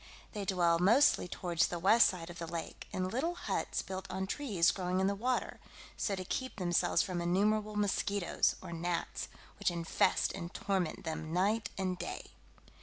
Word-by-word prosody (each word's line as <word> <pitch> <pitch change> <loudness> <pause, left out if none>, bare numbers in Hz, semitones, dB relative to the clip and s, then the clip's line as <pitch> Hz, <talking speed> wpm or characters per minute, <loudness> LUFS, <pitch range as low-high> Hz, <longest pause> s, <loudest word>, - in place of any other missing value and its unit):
They 205 -3 -4
dwell 175 -3 +3
mostly 220 +3 +5
towards 170 -1 0
the 175 - -4
west 200 +7 +6
side 175 -2 -4
of 175 - -10
the 165 - -4
lake, 165 0 -6
in 185 0 -1
little 310 - -1
huts 355 - -2
built 190 -1 -6
on 190 +1 -2
trees 200 -6 +2
growing 185 -1 -1
in 190 - +2
the 200 - +2
water; 245 +5 -1 0.4
so 200 - -1
to 185 -1 -5
keep 260 +7 -3
themselves 175 -4 +2
from 180 -2 -3
innumerable 210 +4 +1
mosquitoes, 200 -2 +1
or 170 - -6
gnats, 170 0 -2 0.3
which - - +2
infest 170 -1 +1
and 170 -2 -6
torment 190 -5 -1
them 160 0 -4
night 200 +5 +1
and 185 -2 -1
day. 175 - -6
185 Hz, 175 wpm, -33 LUFS, 175-205 Hz, 0.4 s, west